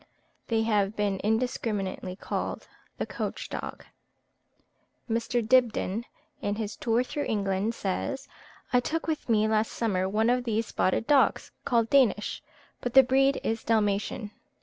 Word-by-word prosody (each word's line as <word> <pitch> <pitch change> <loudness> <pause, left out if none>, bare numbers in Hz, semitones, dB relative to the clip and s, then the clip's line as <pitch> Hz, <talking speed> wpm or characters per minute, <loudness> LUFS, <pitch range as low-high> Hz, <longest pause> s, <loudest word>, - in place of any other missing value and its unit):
They 225 -1 +1
have 210 -2 +1
been 200 -2 0
indiscriminately 210 -4 -1
called - - -4 0.3
the - - -2
Coach - - -4
dog. - - -6 1.2
Mr. 230 0 -1
Dibdin, 235 -3 +2 0.4
in 205 - -1
his 215 -1 -4
"Tour 235 +1 +1
through 290 +3 -3
England," 205 0 0
says, 265 +8 -3 0.5
"I 250 - +6
took 320 +6 -2
with 315 -5 -3
me 215 -1 +3
last 220 0 +1
summer 190 -5 0
one 220 +4 +2
of 250 0 +1
those 225 -1 0
spotted 190 +3 0
dogs 280 0 +3
called 230 -3 +2
Danish, 250 -7 +3 0.4
but 245 0 -4
the 265 - +10
breed 270 +2 +3
is 225 0 -1
Dalmatian. 210 -1 0
225 Hz, 140 wpm, -28 LUFS, 210-245 Hz, 1.2 s, the